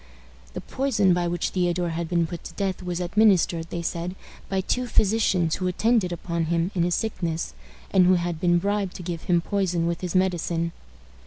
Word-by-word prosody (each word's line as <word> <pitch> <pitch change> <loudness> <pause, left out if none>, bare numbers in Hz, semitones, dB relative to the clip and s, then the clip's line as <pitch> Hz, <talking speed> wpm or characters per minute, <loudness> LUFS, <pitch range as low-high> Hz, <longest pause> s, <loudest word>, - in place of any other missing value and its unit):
The - - -4
poison 230 -9 +1
by 175 0 +1
which 170 0 -1
Theodore 175 -1 0
had 165 0 -3
been 170 -1 +2
put 170 0 -7
to - - -9
death 195 -2 -2
was 180 -1 -3
administered, 180 -3 +3
they 170 - -4
said, 170 +2 -3 0.3
by 190 -1 0
two 250 +6 -1
physicians 195 -7 +2
who 185 - -1
attended 215 +1 +2
upon 170 -1 -2
him 170 +3 0
in 180 - 0
his 175 +1 +2
sickness, 170 -7 -2 0.4
and 185 -2 +5
who 185 - +6
had 175 -2 -2
been 175 -1 +4
bribed 200 +1 -1
to 180 - -7
give 170 -2 -5
him 175 -1 +3
poison 180 -3 0
with 170 0 -2
his 180 0 -4
medicine. 170 -2 +1
175 Hz, 190 wpm, -25 LUFS, 170-190 Hz, 0.4 s, who